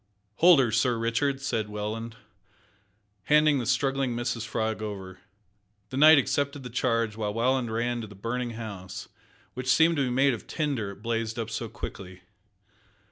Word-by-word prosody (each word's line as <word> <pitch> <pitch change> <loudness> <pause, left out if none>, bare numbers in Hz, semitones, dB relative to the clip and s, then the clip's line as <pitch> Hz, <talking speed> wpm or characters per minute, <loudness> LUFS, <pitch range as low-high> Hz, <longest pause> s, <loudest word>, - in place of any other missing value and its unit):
"Hold 175 -3 +7
her, 125 -4 +2
Sir 120 +2 +2
Richard," 115 +5 0
said 110 -6 -2
Welland, 110 +2 -5 1.1
handing 150 -1 +4
the 120 - -3
struggling 135 0 +1
Mrs 120 -1 -3
Frog 110 -1 -2
over. 95 -3 -6 0.7
The 130 - -4
knight 155 +2 +8
accepted 140 +1 0
the 125 - -8
charge, 115 -3 0
while 105 -1 -3
Welland 125 0 +1
ran 120 +1 -1
to 110 - -7
the 105 - -13
burning 120 +4 -3
house, 95 -5 -7 0.4
which 130 +1 -6
seemed 165 +3 +4
to 140 - +2
be - - -1
made 135 +2 +3
of 115 - -7
tinder, 140 -10 -2
it 100 +1 -11
blazed 115 -1 -2
up 115 -1 -4
so 115 0 -4
quickly. 95 -4 -8
115 Hz, 165 wpm, -27 LUFS, 110-135 Hz, 1.1 s, knight